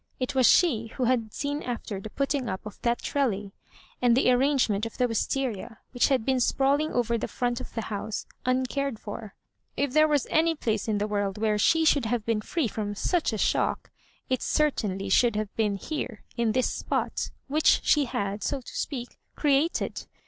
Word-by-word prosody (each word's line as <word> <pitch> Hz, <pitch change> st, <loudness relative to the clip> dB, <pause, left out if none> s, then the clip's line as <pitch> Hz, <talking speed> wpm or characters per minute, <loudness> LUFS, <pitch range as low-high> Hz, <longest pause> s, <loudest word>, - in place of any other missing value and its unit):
It 255 Hz, +2 st, -2 dB
was 260 Hz, -2 st, +5 dB
she 240 Hz, -11 st, +4 dB
who 255 Hz, -, 0 dB
had 235 Hz, -3 st, +1 dB
seea 285 Hz, +6 st, -3 dB
afler 230 Hz, -5 st, -4 dB
the 220 Hz, -, -7 dB
putting 275 Hz, -1 st, -1 dB
up 190 Hz, +1 st, -5 dB
of 210 Hz, -, -9 dB
that 235 Hz, 0 st, 0 dB
trellis, 210 Hz, -8 st, -1 dB, 0.5 s
and 245 Hz, -1 st, +4 dB
the 255 Hz, -, +4 dB
arrangement 250 Hz, -5 st, +2 dB
of 225 Hz, -, -12 dB
the 250 Hz, -, +3 dB
Wisteria^ 230 Hz, -1 st, -2 dB
which 245 Hz, -, +3 dB
had 260 Hz, -5 st, +1 dB
been 265 Hz, -1 st, +2 dB
sprawling 280 Hz, +5 st, +2 dB
over 235 Hz, -1 st, 0 dB
the -, -, -2 dB
Aront 245 Hz, -1 st, -2 dB
of -, -, -10 dB
the 225 Hz, -, -2 dB
bouse, 210 Hz, +1 st, -3 dB, 0.2 s
uncared 260 Hz, 0 st, 0 dB
for. 210 Hz, 0 st, -8 dB, 0.4 s
If 280 Hz, -2 st, 0 dB
there 310 Hz, +1 st, +6 dB
was 295 Hz, -3 st, +2 dB
any 325 Hz, +1 st, +3 dB
place 220 Hz, -7 st, -1 dB
in 215 Hz, -2 st, +1 dB
the 205 Hz, +1 st, -1 dB
world 205 Hz, -2 st, -1 dB
where 215 Hz, 0 st, +1 dB
fibe 325 Hz, +9 st, +3 dB
should 285 Hz, -5 st, +3 dB
have 230 Hz, -1 st, -1 dB
been 225 Hz, -2 st, 0 dB
free 310 Hz, +4 st, -1 dB
from 205 Hz, -1 st, -4 dB
such 340 Hz, -, 0 dB
a 220 Hz, -, -2 dB
shock, -, -, 0 dB, 0.4 s
it 255 Hz, -, 0 dB
certainly 200 Hz, -10 st, 0 dB
should 230 Hz, +3 st, +4 dB
have 210 Hz, -1 st, -3 dB
been 210 Hz, -3 st, +1 dB
here, 240 Hz, 0 st, -5 dB
in 230 Hz, -2 st, +1 dB
this 255 Hz, +1 st, +1 dB
spot, -, -, -2 dB, 0.2 s
which 305 Hz, +3 st, +3 dB
she 295 Hz, -2 st, +4 dB
had, 205 Hz, -3 st, -3 dB
so 280 Hz, +7 st, -1 dB
to -, -, -11 dB
speak, 245 Hz, -4 st, -4 dB, 0.2 s
created. 295 Hz, +2 st, +1 dB
245 Hz, 190 wpm, -27 LUFS, 215-275 Hz, 0.5 s, there